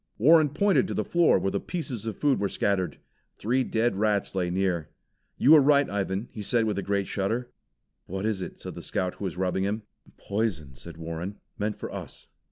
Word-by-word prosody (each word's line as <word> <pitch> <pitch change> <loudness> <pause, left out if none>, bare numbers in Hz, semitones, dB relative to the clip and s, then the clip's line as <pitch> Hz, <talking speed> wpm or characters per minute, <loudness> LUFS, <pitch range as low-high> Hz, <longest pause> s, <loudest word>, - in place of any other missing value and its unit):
Warren 155 +6 +6
pointed 190 +5 +2
to - - -4
the - - -1
floor 170 -1 +4
where 95 - -1
the 100 - -1
pieces 135 - -4
of 110 - -4
food 145 -2 +2
were 100 - 0
scattered. 95 -3 0 0.4
Three 125 +5 +1
dead 115 -2 +1
rats 105 -1 +1
lay 90 -2 0
near. 90 -3 0 0.5
"You 140 - +5
were 155 -2 +9
right, 140 0 +4
Ivan," 100 +2 -2
he 110 - -7
said 115 +2 +1
with 105 -2 -1
a - - -1
great 100 0 0
shudder. 115 +7 -2 0.6
"What 95 +3 -3
is 110 -3 -1
it?" - - -7
said - - -7
the - - -8
Scout 90 -1 -2
who 100 - -4
was 90 -2 -4
rubbing 95 +1 0
him. 105 +2 -1 0.3
"Poison," 100 -10 -2
said 80 +5 -11
Warren. 85 +4 -5 0.2
"Meant 105 0 -1
for - - -6
us." - - -8
100 Hz, 205 wpm, -27 LUFS, 95-120 Hz, 0.6 s, were